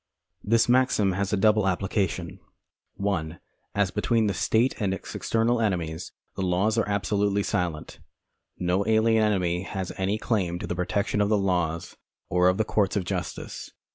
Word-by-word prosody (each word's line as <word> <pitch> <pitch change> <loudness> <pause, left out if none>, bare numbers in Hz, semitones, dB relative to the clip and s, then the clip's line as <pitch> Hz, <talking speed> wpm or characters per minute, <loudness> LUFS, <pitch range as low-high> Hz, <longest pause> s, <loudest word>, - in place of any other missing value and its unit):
This 115 +2 +3
maxim 120 -5 +3
has 95 +1 -2
a 105 - +1
double 105 0 +3
application: 95 -1 -1 0.6
(1) 85 -5 -2 0.4
As 105 -2 +1
between 110 +2 +1
the 100 - +1
state 115 +7 +2
and 95 -2 +1
its - - -9
external 115 +1 +1
enemies, 85 -5 -2 0.2
the - - -4
laws 95 +4 +1
arc 115 - +1
absolutely 100 0 +1
silent. 85 -6 -3 0.6
No 90 +2 +1
alien 110 0 +3
enemy 90 -4 +1
has 95 -1 -4
any 95 +3 0
claim 95 -7 -1
to - - -5
the - - -3
protection 100 +3 0
of 100 - +2
the 105 - +3
laws 90 -3 -1 0.3
or 90 0 +3
of 90 - +1
the 110 - +1
courts 105 -2 +1
of 100 -3 0
justice. - - -5
100 Hz, 165 wpm, -26 LUFS, 90-110 Hz, 0.6 s, This